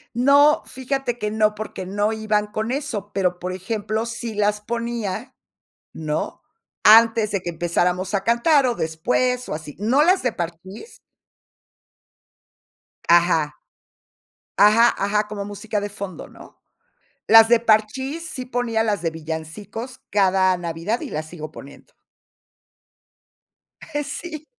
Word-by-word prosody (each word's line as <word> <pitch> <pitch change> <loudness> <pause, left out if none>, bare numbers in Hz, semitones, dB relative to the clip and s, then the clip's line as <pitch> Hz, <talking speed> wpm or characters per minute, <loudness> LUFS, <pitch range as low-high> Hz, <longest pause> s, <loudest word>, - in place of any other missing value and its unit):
No, 280 +4 +5
fíjate 260 -1 -3
que 210 - -2
no, 215 0 +1
porque 210 -3 -6
no 205 +3 -1
iban 215 -1 0
con 215 +3 -3
eso, 235 -8 -4
pero, 180 -2 0
por 180 +1 -5
ejemplo, 215 +3 -3
sí 235 -1 -5
las 210 0 0
ponía, 235 -2 -4 0.6
¿no?, 155 -1 -4 0.4
antes 225 0 +6
de 200 - -1
que 175 - -3
empezáramos 175 +3 -1
a 195 -1 0
cantar, 260 +5 +3
o 245 - 0
después, 250 +11 -1
o - - -2
así. 155 -2 -8
No 235 +8 +3
las 365 +4 +3
de 250 -3 0
Parchís. 175 - -8 2.1
Ajá. 170 -3 +3 1.0
Ajá, 225 +3 +6
ajá, 210 +1 0
como 205 -1 -5
música 205 +1 -4
de 205 0 -4
fondo, 200 -3 -7
¿no? - - -16 0.7
Las 225 0 +8
de 235 -1 +5
Parchís, 260 +9 0
sí 255 -4 -5
ponía 235 -3 -1
las 205 -5 -1
de 165 - 0
villancicos 165 +10 -7
cada 190 -2 +3
Navidad, 170 +6 -3
y - - -6
las 155 +1 -4
sigo 155 -3 -8
poniendo. 140 -2 -14 2.1
Sí. 310 0 -7
210 Hz, 130 wpm, -22 LUFS, 185-235 Hz, 2.1 s, Las